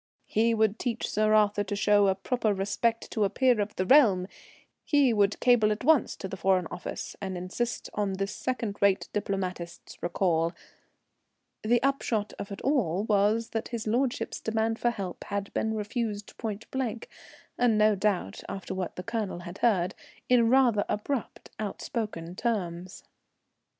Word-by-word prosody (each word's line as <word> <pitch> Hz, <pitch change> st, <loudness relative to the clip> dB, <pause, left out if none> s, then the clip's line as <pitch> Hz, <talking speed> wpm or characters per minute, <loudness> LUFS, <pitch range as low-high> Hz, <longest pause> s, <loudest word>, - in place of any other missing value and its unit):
He 230 Hz, +2 st, +2 dB
would 220 Hz, 0 st, +2 dB
teach 240 Hz, -2 st, -2 dB
Sir 215 Hz, +1 st, +3 dB
Arthur 205 Hz, -1 st, +3 dB
to 205 Hz, +1 st, -3 dB
show 205 Hz, -1 st, +4 dB
proper 215 Hz, +1 st, 0 dB
respect 225 Hz, +4 st, -1 dB
to 215 Hz, -, +1 dB
a 200 Hz, -, +2 dB
peer 250 Hz, 0 st, +3 dB
of 205 Hz, +1 st, -3 dB
the 185 Hz, -, -1 dB
realm; 205 Hz, -7 st, +5 dB, 0.6 s
he 280 Hz, -5 st, +3 dB
would 205 Hz, -1 st, +2 dB
cable 235 Hz, -4 st, +4 dB
at 210 Hz, -, -3 dB
once 310 Hz, 0 st, +4 dB
to 190 Hz, -, -6 dB
the 190 Hz, -, -6 dB
Foreign 185 Hz, 0 st, +2 dB
Office 180 Hz, -, -6 dB
and 190 Hz, -2 st, -3 dB
insist 200 Hz, +7 st, -3 dB
on 205 Hz, -2 st, -1 dB
this 195 Hz, +1 st, -3 dB
second 230 Hz, -5 st, -3 dB
rate 200 Hz, -1 st, +3 dB
diplomatist's 185 Hz, -4 st, -4 dB
recall. 170 Hz, -1 st, +1 dB, 1.1 s
The 235 Hz, +3 st, +2 dB
upshot 235 Hz, -6 st, 0 dB
of 200 Hz, -, -6 dB
it 200 Hz, -, -6 dB
all 210 Hz, -, +1 dB
was 215 Hz, +2 st, +2 dB
that 225 Hz, -, -3 dB
his 235 Hz, -2 st, -4 dB
lordship's 240 Hz, +3 st, -1 dB
demand 225 Hz, 0 st, 0 dB
for 240 Hz, -, +2 dB
help 195 Hz, -6 st, -5 dB
had 200 Hz, -1 st, -4 dB
been 220 Hz, 0 st, 0 dB
refused 210 Hz, -1 st, -3 dB
pointblank, 225 Hz, +2 st, -4 dB, 0.5 s
and 240 Hz, -3 st, +3 dB
no 215 Hz, 0 st, +5 dB
doubt, 195 Hz, -, -1 dB
after 195 Hz, -, -5 dB
what 185 Hz, -2 st, -4 dB
the 180 Hz, -, -6 dB
Colonel 210 Hz, -4 st, -3 dB
had 175 Hz, +2 st, -9 dB
heard, 190 Hz, -6 st, +2 dB, 0.3 s
in 240 Hz, -2 st, +4 dB
rather 240 Hz, -5 st, +4 dB
abrupt, 235 Hz, +4 st, -3 dB
outspoken 205 Hz, -4 st, -4 dB
terms. 185 Hz, -5 st, -3 dB
210 Hz, 155 wpm, -28 LUFS, 195-230 Hz, 1.1 s, realm